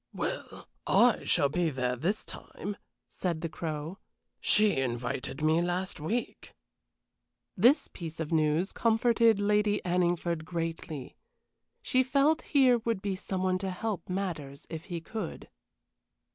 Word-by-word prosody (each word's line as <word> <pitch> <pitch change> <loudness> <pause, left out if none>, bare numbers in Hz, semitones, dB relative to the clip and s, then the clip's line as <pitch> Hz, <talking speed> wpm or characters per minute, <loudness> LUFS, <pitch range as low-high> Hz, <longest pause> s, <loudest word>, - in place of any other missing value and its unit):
"Well, - - -4 0.2
I - - +4
shall 140 - +4
be 175 +2 +1
there 125 -3 -1
this 180 - -1
time," 205 0 -7 0.3
said 170 -4 -3
the 165 - -2
Crow; 155 +3 -5 0.4
"she 210 -5 +4
invited 130 +2 -2
me 160 +2 +4
last 180 +1 -2
week." 220 +11 -4 1.0
This 245 - +4
piece 165 -2 -8
of 160 0 -3
news 160 +3 +2
comforted 230 -1 +3
Lady 210 0 +2
Anningford 175 -2 +1
greatly. 165 -4 -5 0.7
She 255 - +3
felt 280 +4 +3
here 260 -4 +4
would 230 -3 -2
be 200 -2 -1
some 185 0 -3
one 185 0 +1
to 190 0 -2
help 190 0 -4
matters 165 -8 -4
if 160 +1 -6
he 175 -3 -5
could. 210 +1 -6
180 Hz, 130 wpm, -30 LUFS, 160-210 Hz, 1.0 s, I